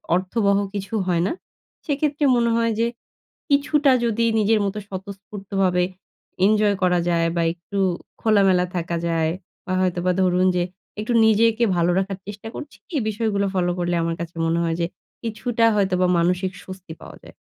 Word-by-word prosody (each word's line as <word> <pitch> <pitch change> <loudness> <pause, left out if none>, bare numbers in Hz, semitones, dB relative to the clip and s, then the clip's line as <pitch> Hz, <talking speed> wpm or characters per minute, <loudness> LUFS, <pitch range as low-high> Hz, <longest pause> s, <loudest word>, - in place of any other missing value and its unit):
অর্থবহ 200 +2 +1 0.2
কিছু 200 +2 -5
হয় 170 -2 +2
না। - - -1 0.5
সেক্ষেত্রে 295 0 -1
মনে 235 -1 +2
হয় 230 0 +1
যে, 230 - +3 0.6
কিছুটা 285 0 +3
যদি 230 0 +1
নিজের 215 +1 +3
মতো 200 +2 -3
স্বতঃস্ফূর্তভাবে 195 -1 -2 0.6
ইনজয় 210 -1 +3
করা 180 -1 +3
যায়। 165 -1 +2
বা 170 - +1
একটু 175 +3 -8 0.4
খোলামেলা 195 -4 +4
থাকা 170 -1 -2
যায় 165 -1 +1 0.3
বা 185 - -3
হয়তোবা 180 0 +1
ধরুন 185 0 +3
যে, 175 - +2 0.4
একটু 220 +3 -2
নিজেকে 225 +2 +3
ভালো 175 0 +2
রাখার 195 0 -3
চেষ্টা 210 +2 -8
করছি। 295 -1 -8 0.2
এই 275 - +1
বিষয়গুলো 210 -2 0
ফলো 180 -1 +1
করলে 175 0 0
আমার 165 0 -1
কাছে 170 0 -7
মনে 165 +1 +1
হয় 165 -1 0
যে, - - +2 0.4
কিছুটা 230 +1 0
হয়তোবা 185 -3 +2
মানসিক 180 +2 +1
স্বস্তি 185 -3 -9
পাওয়া - - -11
যায়। - - -14
195 Hz, 160 wpm, -22 LUFS, 180-220 Hz, 0.6 s, খোলামেলা